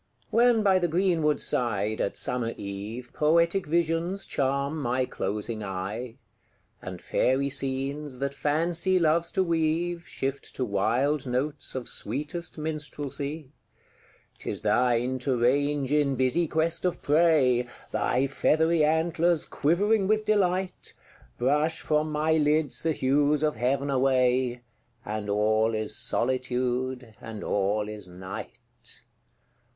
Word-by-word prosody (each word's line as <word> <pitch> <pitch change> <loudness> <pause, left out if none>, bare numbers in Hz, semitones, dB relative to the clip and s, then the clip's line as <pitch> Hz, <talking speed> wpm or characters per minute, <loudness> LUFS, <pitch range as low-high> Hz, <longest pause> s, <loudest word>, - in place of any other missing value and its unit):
When 235 -1 +4
by 190 -2 +4
the 175 - +1
green 175 0 +1
wood 150 -1 +2
side, 110 -3 0
at - - -2
summer 120 -2 -1
eve, 105 +5 -6
Poetic 170 +4 +2
visions 170 +4 0
charm 140 +3 -1
my 125 0 0
closing 105 +1 -4
eye; 100 +5 -5 0.7
And 90 -1 -7
fairy 135 +8 +1
scenes, 135 +1 -2
that 140 +1 -2
Fancy 170 +6 +1
loves 170 0 +2
to 190 - +2
weave, 170 +1 0
Shift 135 +1 -4
to 130 - -1
wild 125 +8 0
notes 135 +4 -3
of 130 -2 -4
sweetest 150 +11 -4
Minstrelsy; 150 -1 -5 0.9
'Tis - - -4
thine 125 +1 +2
to 125 -1 0
range 140 +3 +1
in 145 -2 +2
busy 130 +7 +1
quest 160 +2 0
of 180 -1 -1
prey, 145 -6 +3 0.2
Thy 130 +2 +1
feathery 160 +4 +2
antlers 165 +1 +2
quivering 195 +7 +1
with 215 +1 +1
delight, 190 -3 0 0.4
Brush 150 +6 +1
from 155 0 0
my 150 +1 0
lids 150 -1 +1
the 160 -1 +1
hues 145 +2 +2
of 150 -3 +1
heav'n 135 +4 0
away, 130 -2 +2 0.4
And 105 0 -4
all 110 +2 +2
is 110 0 -1
Solitude, 125 -1 -1
and 110 -2 -7
all 105 +1 0
is 105 -3 -8
Night! 95 +1 -8
140 Hz, 125 wpm, -27 LUFS, 125-160 Hz, 0.9 s, When